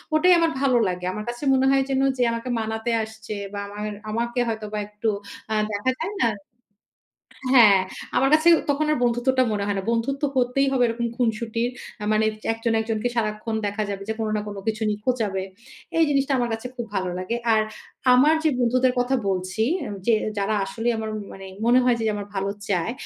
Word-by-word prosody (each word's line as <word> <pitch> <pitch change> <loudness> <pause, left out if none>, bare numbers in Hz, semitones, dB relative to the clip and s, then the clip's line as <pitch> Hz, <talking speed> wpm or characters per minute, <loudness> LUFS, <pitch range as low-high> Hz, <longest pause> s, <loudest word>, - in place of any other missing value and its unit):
ওটাই 360 +4 +6
আমার 330 -1 +2
ভালো 265 -3 +3
লাগে। 180 -1 -3
আমার 210 +1 -5
কাছে 240 +3 -6
মনে 265 0 +3
হয় 270 0 +4
যেন 270 0 +1 0.2
যে 250 - +2
আমাকে 230 +2 -4
মানাতে 220 +1 -2
আসছে 220 0 -7 0.2
বা 205 - -3
আমার 210 +1 -5 0.2
আমাকে 235 +2 -1
হয়তোবা 215 -2 -3
একটু 210 +2 -2 0.4
আ - - +1 0.2
দেখা 205 +5 0
যায় 350 +6 -3
না 235 - +4 1.3
হ্যাঁ, 210 -6 +8 0.4
আমার 270 +1 +3
কাছে 310 +2 +4 0.2
তখন 295 +2 +1
আর - - +1
বন্ধুত্বটা 245 +2 +2
মনে 205 -1 -1
হয় 205 -1 -1
না। - - -2
বন্ধুত্ব 255 +5 -1
হতেই 255 +2 +2
হবে 255 -2 +3
এরকম 235 +1 -2
খুনসুটির। 230 0 0 0.3
আ - - -2
মানে 215 0 +3 0.3
একজন 225 +1 -1
একজনকে 220 +1 -1
সারাক্ষণ 215 0 -1
দেখা 205 +1 -2
যাবে 200 -1 -4
যে 220 - -1
কোনো 220 -1 -1
না - - 0
কোনো 205 -1 -6
কিছু 220 0 -2
নিয়ে 210 0 -2
খোঁচাবে। 220 -7 0 0.6
এই 330 - +6
জিনিসটা 275 -1 +1
আমার 240 -1 0
কাছে 225 +2 -6
খুব 240 -2 -4
ভালো 185 -1 -1
লাগে। 185 +6 -2 0.2
আর 220 -1 +4 0.5
আমার 290 +5 +5
যে - - +5
বন্ধুদের 250 +1 +3
কথা 245 +2 +1
বলছি 185 +2 -1 0.2
উম 205 - -5
যে 235 - +5 0.2
যারা 200 +2 0
আসলেই 225 +4 -1
আমার 220 0 -3
উম 215 - -4 0.4
মনে 245 +2 +6
হয় 250 -1 +3
যে - - -1
আমার 205 -1 -5
ভালো 195 0 -1 0.2
চায়, 190 +2 0
225 Hz, 195 wpm, -24 LUFS, 210-250 Hz, 1.3 s, হ্যাঁ